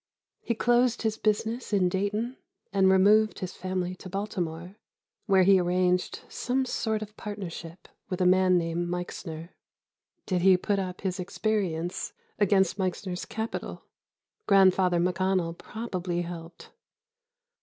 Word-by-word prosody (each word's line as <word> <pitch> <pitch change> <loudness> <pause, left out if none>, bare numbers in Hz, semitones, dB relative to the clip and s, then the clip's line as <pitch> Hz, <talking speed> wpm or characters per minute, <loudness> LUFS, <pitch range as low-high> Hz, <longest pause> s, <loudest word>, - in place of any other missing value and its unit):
He 235 - -1
closed 240 +1 +2
his 220 -1 +1
business 225 +3 -1
in 195 -3 +3
Dayton 210 +7 -1 0.4
and 190 -1 +4
removed 210 +3 +5
his 185 -1 -5
family 185 -1 -3
to 185 - -10
Baltimore, 180 -3 -4 0.5
where 190 -2 +5
he 190 0 +6
arranged 180 0 +1
some 260 +2 -1
sort 220 -3 -1
of 210 0 -12
partnership 180 -4 -7 0.2
with 185 -1 -3
a 185 - +2
man 185 0 +5
named 170 0 -1
Meixner. 170 -2 -5 0.8
Did 185 -3 0
he 185 0 +6
put 200 +2 0
up 185 -1 -4
his 190 -1 -2
experience 180 -3 -2 0.3
against 195 -2 +3
Meixner's 185 -1 -2
capital? 220 +1 -5 0.6
Grandfather 190 -2 +5
McConnell 180 -1 0
probably 185 -5 -4
helped. 170 -1 -9
185 Hz, 125 wpm, -28 LUFS, 180-210 Hz, 0.8 s, he